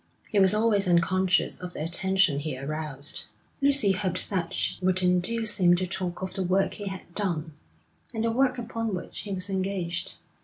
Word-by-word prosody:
He 205 - +3
was 190 +1 +5
always 210 -3 +3
unconscious 180 +2 +2
of 180 -1 -6
the - - -4
attention 185 -2 +2
he 145 -2 -4
aroused. 145 0 -4 0.4
Lucy 275 -7 +4
hoped 185 0 -2
that 175 -3 -1
she 185 - -2
would 185 0 +2
induce 210 +5 +2
him 175 -1 +6
to 185 +1 -1
talk 185 0 -4
of 190 - -4
the 190 - -3
work 185 +2 +1
he 205 -2 -6
had 190 -2 -7
done, 170 -6 -2 0.6
and 220 - -2
the 230 - +1
work 260 +2 +2
upon 230 -3 -3
which 180 - -7
he 205 - -6
was 185 0 0
engaged. 185 -3 -2
185 Hz, 185 wpm, -27 LUFS, 175-205 Hz, 0.6 s, him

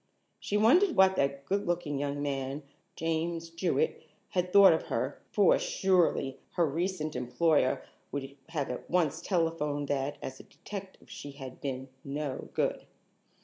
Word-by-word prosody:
She 205 - -1
wondered 325 - +5
what 190 0 +6
that 140 0 0
good 200 +6 -1
looking 170 -5 -1
young 145 0 -2
man, 135 0 -2 0.3
James 165 +1 -2
Jewett, 185 - 0 0.3
had 180 -2 -1
thought 200 -2 +9
of 160 - -2
her, - - -2
for, - - +5
surely, 185 - +1
her 170 - +3
recent 160 0 -2
employer 130 +3 +2 0.3
would 140 -1 -5
have 145 -6 -2
at 125 - -7
once 170 -5 +1
telephoned 165 -5 0
that 140 +1 -1
as 130 0 -7
a - - -10
detective 195 -2 -9
she 145 - -8
had 135 -2 -9
been 130 -1 -4 0.2
"no 140 -1 -4
good." - - 0
160 Hz, 145 wpm, -30 LUFS, 140-185 Hz, 0.3 s, thought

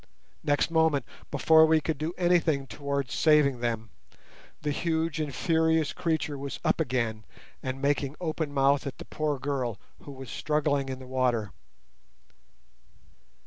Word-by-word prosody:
Next 145 +2 +1
moment, 160 -5 +3 0.2
before 160 0 +5
we 160 0 +4
could 155 -1 -3
do 160 +3 -3
anything 170 -6 +2
towards 140 -4 -3
saving 150 -5 +4
them, 115 -3 -2 0.7
the 150 - 0
huge 160 0 -1
and 150 -2 -2
furious 160 0 +1
creature 160 -4 -1
was 140 0 -5
up - - +2
again 115 -4 -1 0.4
and 130 +1 -4
making 140 0 0
open 160 -3 -2
mouthed 140 0 +2
at 135 - -6
the - - -9
poor 150 -2 -2
girl, 130 -5 -2 0.2
who 145 - -11
was 135 -2 -9
struggling 145 -2 0
in 130 - -4
the 130 - -11
water. 125 -5 0
145 Hz, 145 wpm, -28 LUFS, 130-160 Hz, 0.7 s, before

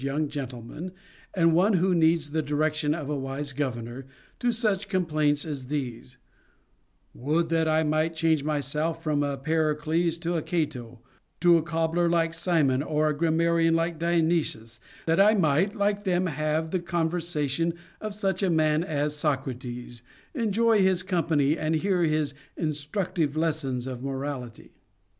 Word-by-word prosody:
3 135 - -2
69 145 +2 -1
gentleman, 135 +4 -6 0.4
and 165 -3 +4
one 190 +6 +4
who 185 0 +3
needs 160 -2 +2
the 160 +1 0
direction 150 0 0
of 155 -4 -5
a 150 - -1
wise 135 +1 -4
gov 135 -3 -1
ernor, 120 +3 -7 0.3
to 245 - +2
such 210 -4 0
complaints 155 -6 +1
as 140 -5 -5
these: 130 -3 -5 0.5
" - - -43
Would 160 +5 0
that 165 -1 +2
I 155 0 +3
might 155 +2 0
change 160 -2 +2
myself 150 +2 -2
from 150 -2 +1
a 140 -1 -1
Pericles 160 +3 0
or 170 0 +1
a - - -4
Cato 125 -9 -3 0.4
to 175 0 +6
a - - +1
cobbler 165 +1 0
like 165 -1 +1
Simon 165 -6 +1
or 155 +1 +1
a - - +1
grammarian 165 +1 +2
like 165 -1 -1
Dionysius, 165 -9 0 0.3
that 165 +2 +2
I 210 +2 +6
might 185 +3 +2
like 205 -1 0
them 185 -2 +1
have 155 0 -1
the 185 - +1
conversation 165 -2 -1 0.3
of 215 -1 -5
such 195 -3 -1
a 195 - +2
man 155 -1 +2
as 150 -2 -1
Socrates, 125 -5 -3 0.3
enjoy 230 -3 +2
his 190 -1 +3
company, 160 -6 +1
and 155 +1 0
hear 180 +2 +1
his 155 -2 0 0.2
instructive 155 0 -1
lessons 145 -6 -1
of 130 -2 -5
morality." 135 -3 -5
155 Hz, 155 wpm, -26 LUFS, 145-170 Hz, 0.5 s, to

